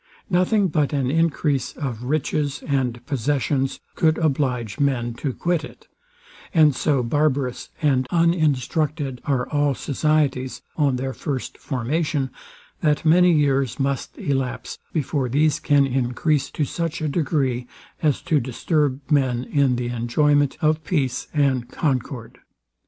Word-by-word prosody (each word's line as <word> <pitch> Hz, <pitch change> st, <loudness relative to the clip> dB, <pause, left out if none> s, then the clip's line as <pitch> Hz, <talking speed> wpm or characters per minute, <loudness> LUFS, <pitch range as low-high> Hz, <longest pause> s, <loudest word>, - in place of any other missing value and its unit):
Nothing 190 Hz, +3 st, +3 dB
but 150 Hz, -3 st, 0 dB
an 135 Hz, -3 st, 0 dB
encrease 150 Hz, -4 st, +1 dB
of 125 Hz, -5 st, -5 dB
riches 145 Hz, 0 st, -1 dB
and 130 Hz, -4 st, -1 dB
possessions 135 Hz, +1 st, 0 dB
could 160 Hz, -1 st, +2 dB
oblige 130 Hz, -7 st, -1 dB
men 125 Hz, -4 st, +1 dB
to 135 Hz, +3 st, -3 dB
quit 170 Hz, +4 st, -1 dB
it; -, -, -12 dB, 0.7 s
and 155 Hz, -3 st, +6 dB
so 140 Hz, -3 st, +1 dB
barbarous 135 Hz, 0 st, 0 dB
and 130 Hz, -3 st, +2 dB
uninstructed 155 Hz, -4 st, +1 dB
are 130 Hz, -3 st, 0 dB
all 145 Hz, -2 st, +1 dB
societies 140 Hz, -3 st, 0 dB
on 145 Hz, -4 st, +2 dB
their 130 Hz, +1 st, -3 dB
first 130 Hz, +2 st, -4 dB
formation, 140 Hz, +1 st, -1 dB, 0.5 s
that 150 Hz, -1 st, +1 dB
many 180 Hz, +3 st, +6 dB
years 140 Hz, -5 st, +1 dB
must 135 Hz, 0 st, -2 dB
elapse 135 Hz, -3 st, -3 dB
before 140 Hz, -4 st, -1 dB
these 150 Hz, +4 st, +2 dB
can 145 Hz, -2 st, +3 dB
encrease 135 Hz, +3 st, 0 dB
to 150 Hz, -, -1 dB
such 165 Hz, +3 st, -3 dB
a 155 Hz, -, -1 dB
degree, 135 Hz, -5 st, 0 dB, 0.3 s
as 150 Hz, -4 st, +1 dB
to 160 Hz, -5 st, +2 dB
disturb 135 Hz, +2 st, 0 dB
men 130 Hz, -4 st, +2 dB
in 135 Hz, -2 st, +2 dB
the 120 Hz, 0 st, -2 dB
enjoyment 140 Hz, +4 st, +2 dB
of 155 Hz, 0 st, +2 dB
peace 140 Hz, -7 st, -1 dB
and 135 Hz, -5 st, +1 dB
concord. 130 Hz, -5 st, -3 dB
140 Hz, 130 wpm, -23 LUFS, 130-155 Hz, 0.7 s, and